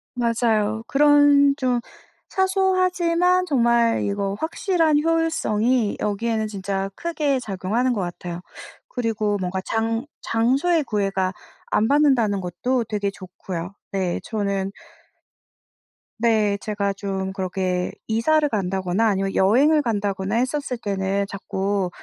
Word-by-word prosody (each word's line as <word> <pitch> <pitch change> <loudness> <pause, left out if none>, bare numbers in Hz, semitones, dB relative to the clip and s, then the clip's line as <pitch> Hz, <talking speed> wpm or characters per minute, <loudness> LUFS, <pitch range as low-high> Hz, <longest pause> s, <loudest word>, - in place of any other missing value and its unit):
맞아요. 225 -2 +1
그런 290 -1 +5
좀 255 -3 +1 0.5
사소하지만 365 -2 +2
정말 235 -5 +2
이거 200 -1 -1
확실한 325 -2 +1
효율성이 255 -9 +1
여기에는 220 +1 -1
진짜 195 -1 -3
크게 300 -5 -1
작용하는 220 +3 -1
것 205 - -2
같아요. 175 -1 -5 0.5
그리고 215 -4 -1
뭔가 185 0 -2
장 225 +3 -1 0.2
장소의 275 +9 +2
구애가 195 -4 -1 0.4
안 220 - +3
받는다는 260 -9 +3
것도 230 +8 -1
되게 205 -2 -1
좋고요. 185 -1 -7 0.2
네. 185 -3 -1
저는 200 -3 -2 1.5
네. 220 -3 +2
제가 200 -2 -1
좀 190 -1 -4
그렇게 185 -1 -2 0.2
이사를 295 +8 +2
간다거나 190 0 0
아니면 195 -2 0
여행을 280 +11 +4
간다거나 200 -4 -1
했었을 255 +1 -1
때는 200 -2 -1
자꾸 200 -1 -2
220 Hz, 260 characters per minute, -23 LUFS, 195-275 Hz, 1.5 s, 그런